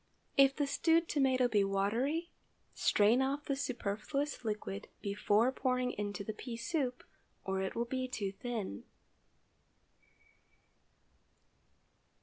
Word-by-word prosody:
If 275 0 +6
the 290 - +1
stewed 325 +4 +3
tomato 260 -3 +3
be 210 -4 +3
watery, 230 - 0 0.4
strain 215 +5 +4
off 280 +2 -1
the 275 - 0
superfluous 270 +3 -2
liquid 210 - -4
before 210 +4 +2
pouring 255 -1 0
into 205 -1 -4
the 215 - -4
pea 230 +2 -6
soup, 255 0 -2 0.4
or 190 0 -1
it 190 - -3
will 235 +1 0
be 255 +1 -2
too 205 -6 -3
thin. 200 - -5
245 Hz, 115 wpm, -34 LUFS, 205-275 Hz, 0.4 s, If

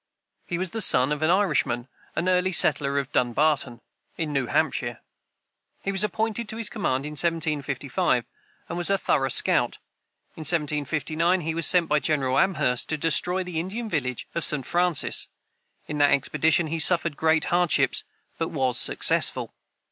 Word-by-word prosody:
He 175 - -3
was 185 0 -3
the 225 - -1
son 130 -7 +6
of 150 0 -2
an 155 - +1
Irishman, 150 -10 0 0.3
an 170 +3 -2
early 185 0 +1
settler 140 -5 +2
of 140 0 -3
Dunbarton, 130 -1 0 0.4
in 155 -3 -4
New 135 -3 -1
Hampshire. - - -1 0.8
He 195 - -2
was 195 +1 0
appointed 220 +2 -3
to 220 - -4
his 225 -3 -2
command 135 - -2
in 150 - -6
1755, 155 -2 -1 0.4
and 175 - -5
was 175 - 0
a 195 - +2
thorough 135 -7 0
scout. - - +2 0.6
In - - -10
1759, 155 +3 0
he 160 0 -3
was 165 -2 +3
sent 180 -3 +6
by 150 -1 +1
General 135 -5 0
Amherst 150 -10 0
to 155 - -2
destroy 180 +4 +2
the 180 -3 -5
Indian 205 +7 -5
village 135 - -3
of 170 - -2
St. 145 -4 +3
Francis. 175 0 +1 0.6
In 150 - -5
that 145 0 +4
expedition 155 +4 +2
he 165 +1 -4
suffered 170 -1 +3
great 160 +1 +1
hardships, 170 -6 +2 0.4
but 165 - -1
was 130 -4 -1
successful. - - +1
160 Hz, 165 wpm, -24 LUFS, 140-180 Hz, 0.8 s, son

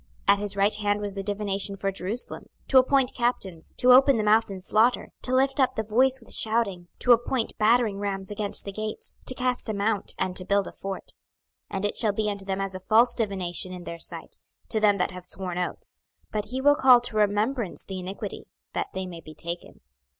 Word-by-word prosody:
26:021:022 - - +8
At 200 - -2
his 205 -1 -2
right 200 +2 +4
hand 205 -1 0
was 205 -1 -4
the 195 - -4
divination 200 0 0
for 195 0 -2
Jerusalem, 195 +5 -4 0.2
to 265 - +7
appoint 260 0 +2
captains, 200 -9 -2
to 250 - +5
open 270 0 +7
the 215 - 0
mouth 215 +1 +3
in 195 - -5
the - - -8
slaughter, 220 +6 +2
to 255 - +1
lift 270 +1 +2
up 260 - +2
the 220 - -1
voice 255 +5 +2
with 230 - -4
shouting, 215 -6 0
to 250 - +2
appoint 240 0 +2
battering 215 -2 +3
rams 195 -1 -3
against 205 0 -1
the 200 - -4
gates, 215 +2 -5
to 255 - +3
cast 250 -2 -2
a 215 - -1
mount, 205 +1 -1
and 185 -1 -2
to 185 - +1
build 200 +1 +1
a - - -7
fort. 195 0 -7 0.6
26:021:023 - - -5
And 195 - -2
it 205 - -1
shall 215 -3 +2
be 210 0 0
unto 200 -1 -7
them 195 0 -2
as 195 -1 -3
a 185 - -6
false 225 +5 +4
divination 190 -5 -1
in 180 -1 -8
their 170 -1 -7
sight, - - -3 0.3
to 220 - 0
them 205 -1 +4
that 180 - 0
have 180 -1 -9
sworn 180 -1 -3
oaths: 180 - -4 0.3
but 210 -1 -2
he 255 +5 -4
will 290 +1 +6
call 255 -3 +7
to 240 - -2
remembrance 210 +1 0
the 190 -1 -6
iniquity, 185 +2 -6 0.3
that - - -2
they 190 0 -3
may 170 -2 -8
be 155 -1 -13
taken. 170 +3 -6
205 Hz, 225 wpm, -26 LUFS, 195-235 Hz, 0.6 s, 26:021:022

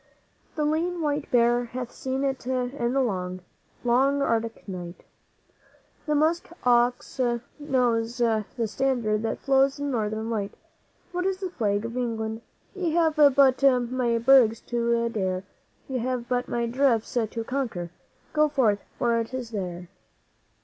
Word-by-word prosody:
'The 305 -2 0
lean 335 +4 0
white 295 -2 -1
bear 240 0 +3
hath 245 0 -6
seen 265 +1 -3
it 270 -2 -2
in 250 -1 -1
the 275 - +2
long, 185 -6 -2 0.4
long 265 +4 +3
Arctic 230 -5 -1
night, 175 -2 -7 1.0
The 300 - +2
musk 315 +3 +1
ox 245 +1 +2 0.4
knows 245 -5 0
the 225 -3 +2 0.2
standard 225 -2 0
that 225 - -3
flouts 270 0 +3
the 285 - -5
Northern 220 -4 -2
Light: 205 -3 -3 0.6
What 360 +1 -1
is 385 -1 -1
the 375 -2 -5
Flag 210 - 0
of 230 +1 -5
England? 225 -2 -2 0.3
Ye 360 -5 -2
have 325 -2 +3
but 275 -3 +5 0.3
my 245 -2 +1
bergs 235 -2 +5
to 235 -1 0
dare, 190 -4 -2 0.4
Ye 260 -2 -2
have 245 0 -2
but 250 0 -1
my 235 0 -1
drifts 240 -2 +1
to 230 -1 -1
conquer. 225 -10 -3 0.4
Go 305 0 +3
forth, 230 -8 +2 0.2
for 235 -1 +2
it 230 +3 -4
is 245 -3 -5
there!' 180 -4 -5
245 Hz, 145 wpm, -26 LUFS, 225-275 Hz, 1.0 s, but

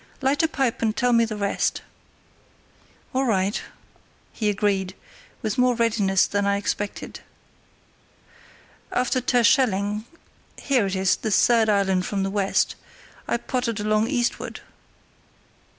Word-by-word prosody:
"Light 275 +3 +1
a 320 - +3
pipe 270 -6 -1
and 220 -1 0
tell 245 0 +2
me 230 0 +4
the 220 -1 -5
rest." 200 -1 -1 1.3
"All 260 +1 +1
right," 200 -3 0 0.7
he 215 -2 -1
agreed, 200 -2 0 0.5
with 220 +1 -2
more 250 -1 +3
readiness 210 -5 +2
than 205 0 -1
I 200 0 +2
expected. 205 0 -4 1.7
"After 250 +1 0
Terschelling—here 240 - 0
it 195 - -3
is, 190 0 +2
the 220 - -3
third 225 +2 +4
island 195 -3 +1
from 200 -2 -1
the 195 - -2
west—I 200 +3 -2
pottered 240 -3 -2
along 215 +1 +1
eastward." 240 -3 -2
215 Hz, 120 wpm, -24 LUFS, 200-245 Hz, 1.7 s, me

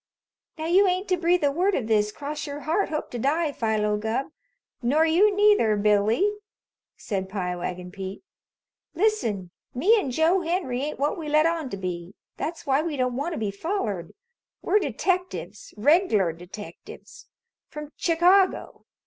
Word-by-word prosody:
"Now 315 - -4
you 375 +4 +4
ain't 370 +2 0
to 365 - +3
breathe 350 0 +2
a 285 - +3
word 370 +7 +1
of 245 - -1
this, 210 -1 +2
cross 295 +5 -5
your 285 +1 -6
heart, 330 +7 0
hope 305 -1 -4
to 245 - -4
die, 300 +5 +1
Philo 215 -4 0
Gubb. 220 +7 -2 0.5
Nor 290 +7 +3
you 390 +6 +4
neither, 410 - +4
Billy," 210 - +3 0.7
said 190 -3 -4
Pie 180 -3 -3
Wagon 180 0 -5
Pete. 195 - -7 0.7
"Listen! 235 - 0 0.2
Me 380 - +4
an' 330 - -3
Joe 320 +8 +2
Henry 330 -8 -1
ain't 295 +2 -3
what 290 +4 -1
we 310 -2 -5
let 305 +1 +4
on 330 -4 0
to 200 - -5
be. 180 0 -5 0.2
That's 330 +1 -4
why 275 0 +2
we 315 -3 -3
don't 250 -1 0
want 290 +7 -2
to - - -4
be 210 -2 -1
follered. 210 - -3 0.5
We're 410 +4 +3
detectives. 365 -2 -2
Reg'lar 220 - +3
detectives. 205 - -11 0.4
From 300 -1 -8
Chicago. 360 +3 +2
290 Hz, 160 wpm, -25 LUFS, 210-345 Hz, 0.7 s, you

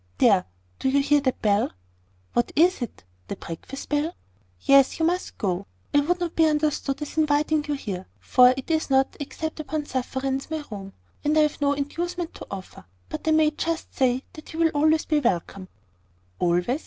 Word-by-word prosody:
There! 200 -6 +5 0.3
do - - +1
you 280 +1 +3
hear 290 +1 +3
that 260 -2 -1
bell?" 205 -1 +3 0.6
"What 240 - +1
is 345 +1 +4
it? 240 - -6 0.2
The - - -4
breakfast 170 +11 -8
bell?" 300 +3 0 0.5
"Yes. 275 -1 +5
You 325 - +3
must 355 +2 -1
go. 190 -2 -2 0.3
I 290 - +6
would 350 +5 +1
not 345 -2 -3
be 325 -1 +5
understood 300 -2 0
as 295 - -4
inviting 300 0 +2
you 295 - -1
here; 190 -8 -5
for 250 -1 +6
it 270 +5 -4
is 315 -2 +1
not, 265 0 +3
except 315 +2 -5
upon 310 -1 -3
sufferance, 265 +1 -2
my 315 -1 -3
room; 195 -2 -7 0.3
and 300 +1 +2
I - - +7
have 300 -1 0
no 285 0 +3
inducement 340 +5 -3
to - - -10
offer. 190 -1 -8 0.2
But - - -6
I - - +4
may 310 -1 +4
just 325 +2 -3
say, 260 0 +1
that 310 - -11
you - - -6
will 325 -1 +4
always 310 +2 +3
be 305 -2 +2
welcome." 190 - -1 0.7
"Always?" 180 - +1
290 Hz, 190 wpm, -25 LUFS, 250-315 Hz, 0.7 s, I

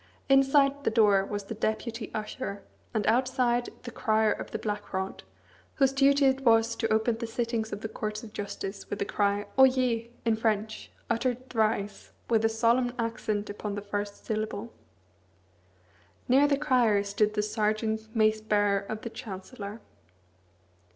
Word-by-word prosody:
Inside 275 +1 +4
the - - +2
door 210 -3 +4
was 205 +1 -4
the 200 - -6
Deputy 220 +1 -3
Usher; 215 -1 -5 0.3
and 215 -3 -1
outside, 245 0 +2
the 240 - -7
Crier 220 -1 +2
of - - -4
the - - -3
Black 210 -1 -4
Rod, 190 +1 -3 0.5
whose 270 -2 +3
duty 275 +1 +4
it 265 0 +3
was 230 -2 +4
to 225 - -1
open 220 +1 +2
the 230 - -3
sittings 230 -1 -2
of 205 - -5
the 220 - -3
Courts 215 0 -4
of 215 -2 -10
Justice 195 -1 -6
with 205 - -3
the 200 - -1
cry, 205 0 0
"Oyez!" 255 -3 +4 0.2
in 225 -1 +2
French, 220 -1 -1 0.2
uttered 245 +2 -1
thrice, 215 -3 -1 0.2
with 225 -1 +3
a 225 - +4
solemn 235 +2 +2
accent 225 -3 -2
upon 205 0 -5
the 205 - -4
first 205 0 -4
syllable. 215 +1 -3 1.5
Near 270 +3 +5
the 285 -1 +2
Crier 245 -8 +3
stood 210 +1 0
the 210 - +1
Serjeant 220 +1 -1
Mace 215 -1 +3
Bearer 205 -2 +2
of 210 +2 -6
the 230 - -5
Chancellor. 205 +1 -8
220 Hz, 155 wpm, -28 LUFS, 210-240 Hz, 1.5 s, Near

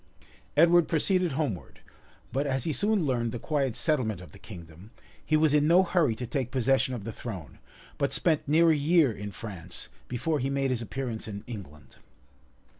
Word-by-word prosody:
[*] - - -30
Edward 170 +1 +6
proceeded 180 0 +1
homeward; 135 - -3 0.5
but 140 +2 0
as 130 -2 0
he 160 - -1
soon 205 0 +1
learned 120 -4 0
the 120 - -4
quiet 135 -1 -1
settlement 130 - 0
of 90 - -12
the 100 - -15
kingdom, 85 -1 -12 0.3
he 155 - +2
was 155 -1 +3
in 150 0 +4
no 175 +3 +6
hurry 170 -10 +2
to 125 - -5
take 125 0 -2
possession 130 0 +1
of 110 - -7
the 115 - -5
throne, 95 - -8 0.4
but 140 - +1
spent 160 -5 +1
near 165 +3 +5
a - - +3
year 150 -1 +3
in 105 -1 -6
France, 90 -4 -9 0.2
before 150 +5 -1
he 135 +1 -1
made 135 -1 0
his 120 -2 -1
appearance 115 +1 -5
in 100 -1 -6
England. 75 - -10
130 Hz, 190 wpm, -28 LUFS, 110-155 Hz, 0.5 s, Edward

